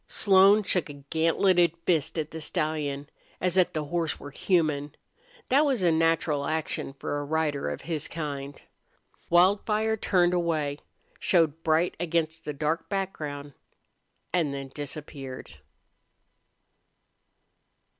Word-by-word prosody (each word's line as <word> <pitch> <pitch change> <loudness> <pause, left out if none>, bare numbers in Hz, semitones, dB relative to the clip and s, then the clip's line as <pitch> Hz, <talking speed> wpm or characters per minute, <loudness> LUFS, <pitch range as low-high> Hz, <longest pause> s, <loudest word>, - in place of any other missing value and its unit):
Slone 200 +1 +5
shook 180 -4 0
a - - -7
gantleted 165 +4 +2
fist 165 -2 +1
at 155 -1 -2
the 160 - -7
stallion, 150 -2 -2 0.3
as 180 -1 0
if 185 -2 +4
the 155 - -2
horse 165 +2 -2
were 145 - -9
human. 150 -4 0 0.5
That 275 +4 +5
was 265 -9 +1
a 170 - +4
natural 160 -3 +1
action 155 -3 -2
for 145 +1 -4
a - - -3
rider 150 -1 -1
of - - -5
his 160 -4 -3
kind. 145 -3 -5 0.7
Wildfire 210 +5 +3
turned 180 -3 +2
away, 155 -5 0 0.4
showed 165 -3 +2
bright 160 +2 +2
against 165 -1 -1
the 150 - -2
dark 155 +3 -2
background, 150 -8 -4 0.8
and 165 -5 +1
then 135 -1 -6
disappeared. 140 -2 -7
160 Hz, 125 wpm, -27 LUFS, 145-175 Hz, 0.8 s, Slone